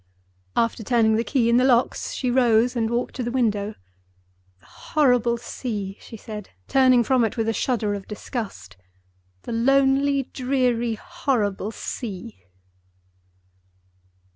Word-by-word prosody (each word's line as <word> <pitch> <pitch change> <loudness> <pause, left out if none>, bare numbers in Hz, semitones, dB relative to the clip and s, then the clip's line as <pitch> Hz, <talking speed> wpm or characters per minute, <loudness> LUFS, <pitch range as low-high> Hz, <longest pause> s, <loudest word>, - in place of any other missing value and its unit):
After 230 0 0
turning 225 -1 +3
the 225 - +1
key 245 -2 +1
in 235 +1 +4
the 250 - +4
locks, 250 -2 +2
she 250 -2 -1
rose 240 -1 +3
and 225 -2 0
walked 240 +1 -2
to 255 - -2
the 240 - -2
window. 215 -4 0 0.8
"The - - -26
horrible 245 -5 +1
sea!" 210 -5 -5
she 225 - -10
said, 210 -1 -8 0.2
turning 255 -2 +5
from 255 +1 +2
it 225 +2 -1
with 225 -1 0
a 225 - +1
shudder 225 -4 0
of 200 -1 -6
disgust—"the 95 - -9
lonely, 270 +3 +3
dreary, 250 -3 0
horrible 220 - -2
sea!" 185 - -7
235 Hz, 130 wpm, -23 LUFS, 210-255 Hz, 0.8 s, turning